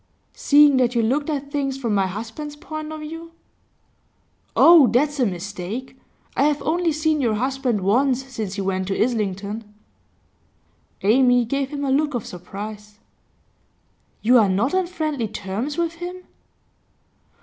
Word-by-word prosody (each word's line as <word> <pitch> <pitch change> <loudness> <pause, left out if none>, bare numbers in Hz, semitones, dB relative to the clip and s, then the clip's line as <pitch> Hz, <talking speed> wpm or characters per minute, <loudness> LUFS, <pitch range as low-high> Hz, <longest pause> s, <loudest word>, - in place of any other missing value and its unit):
'Seeing 290 -1 +5
that 250 -1 +2
you 230 - +2
looked 280 +7 0
at 285 -2 -3
things 275 -2 -2
from 235 -5 -2
my 195 -2 +2
husband's 230 +10 -6
point 310 +1 -7
of 310 -1 -7
view?' 325 +2 -8 1.2
'Oh, 330 -5 +8
that's 285 +5 +1
a 250 - +3
mistake! 195 +7 -6 0.4
I 275 - +3
have 295 -1 +2
only 340 +1 +1
seen 310 0 0
your 230 -4 +1
husband 255 -2 -1
once 255 +7 +2
since 220 -7 -5
he 200 - -3
went 190 -1 -2
to 195 - -2
Islington.' 210 -2 -2 1.3
Amy 245 +3 +4
gave 275 +3 -2
him 285 -1 -4
a 270 - 0
look 295 0 +1
of 235 - -3
surprise. 210 +4 -8 1.3
'You 245 +3 +6
are 210 -3 +3
not 205 - +1
on 375 -1 +1
friendly 305 - -2
terms 215 - -4
with 335 -1 0
him? 355 +2 -7
260 Hz, 150 wpm, -22 LUFS, 210-295 Hz, 1.3 s, Oh